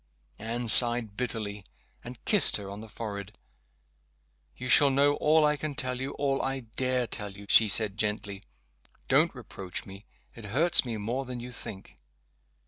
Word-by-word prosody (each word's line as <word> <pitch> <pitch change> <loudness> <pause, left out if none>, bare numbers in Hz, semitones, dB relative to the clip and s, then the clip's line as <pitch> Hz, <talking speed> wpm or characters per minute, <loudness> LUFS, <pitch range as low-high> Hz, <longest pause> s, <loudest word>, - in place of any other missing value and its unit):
Anne 115 +2 -5
sighed 120 -2 +7
bitterly, 105 -5 -5 0.4
and 120 0 -12
kissed 210 - +3
her 100 -1 -9
on 100 +1 -9
the 110 - -12
forehead. 105 -2 -8 1.2
"You 125 - -7
shall 140 +3 +5
know 140 +2 +2
all 155 0 +3
I 150 0 +1
can 150 -1 -6
tell 125 -1 -5
you 135 - -5
all 140 -1 -2
I 135 0 -3
dare 125 +2 -2
tell 105 -3 -5
you," 100 +1 -13
she 110 0 +5
said, 105 0 0
gently. 105 -2 -3 0.7
"Don't - - +2
reproach 95 -2 -9
me. 100 +1 -13 0.3
It 115 - -12
hurts 150 - +3
me 115 -3 -5
more 120 +6 -4
than 125 -1 -7
you 125 +1 -9
think." 100 -4 -8
120 Hz, 165 wpm, -27 LUFS, 105-130 Hz, 1.2 s, sighed